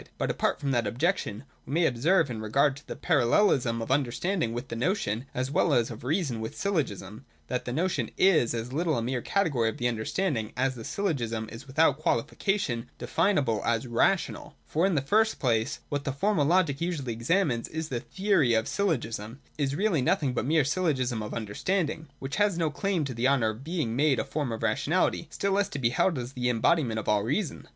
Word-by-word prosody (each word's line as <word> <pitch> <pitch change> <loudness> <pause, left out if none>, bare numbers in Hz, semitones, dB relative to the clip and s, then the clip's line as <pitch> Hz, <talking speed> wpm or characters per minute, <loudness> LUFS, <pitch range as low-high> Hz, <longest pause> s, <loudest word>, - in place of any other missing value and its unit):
But - - 0
apart - - 0
from 140 - -1
that 120 -4 +1
objection, 125 - -1 0.2
we 135 - -5
may 170 0 +3
observe 150 +4 +2
in 110 -2 -5
regard 135 +6 +2
to 145 - -15
the - - -5
parallelism 125 - +2
of 120 - -5
understanding 145 - 0
with 120 +1 -5
the - - -4
notion, 125 - -1
as 130 +2 -2
well - - +3
as 120 -1 +1
of 115 - -9
reason 140 - -1
with 110 - -6
syllogism, 115 - -2 0.3
that 125 -1 -2
the 120 - -3
notion 175 +8 -1
is 160 -12 +4
as 115 +2 -4
little 160 -1 +1
a 115 - -1
mere 125 +1 -2
category 145 - +1
of - - -6
the 120 - 0
understanding 115 - -1
as 130 +1 +1
the 120 -3 -9
syllogism 115 - -2
is 120 +4 -10
without 145 +1 +3
qualification 130 - -1
definable 125 - +1
as 115 +1 0
rational. 125 +10 0
For, 165 +5 +1
in 190 - 0
the 140 - +1
first 220 +9 +2
place, 115 0 0
what 145 -1 -2
the 140 - -1
Formal 160 +2 +1
Logic 165 -5 +2
usually 155 -9 -2
examines 120 - 0
in 160 - -9
its 160 - -6
theory 130 - +1
of 110 0 +1
syllogism, 120 - -2 0.2
is 140 -1 0
really 190 -5 +1
nothing 130 +1 +1
but - - 0
the - - -4
mere 155 -2 +3
syllogism 135 -7 0
of 105 - -5
understanding, 155 - -2
which 135 +1 -5
has 205 -4 +2
no 160 -3 0
claim 180 0 -1
to 135 - -4
the 120 +2 +1
honour 130 -5 +3
of 110 +4 -11
being 155 -8 -2
made 145 0 +3
a - - -1
form 145 -5 -2
of 115 - -4
rationality, - - +1
still 200 - -2
less 200 +1 +1
to - - -5
be 120 -4 +1
held 165 +4 +2
as 125 +1 -5
the 125 -1 -1
em 120 -2 0
bodiment 130 -6 +2
of 110 - -4
all 105 -1 +3
reason. 145 - -2
135 Hz, 210 wpm, -28 LUFS, 115-165 Hz, 0.3 s, is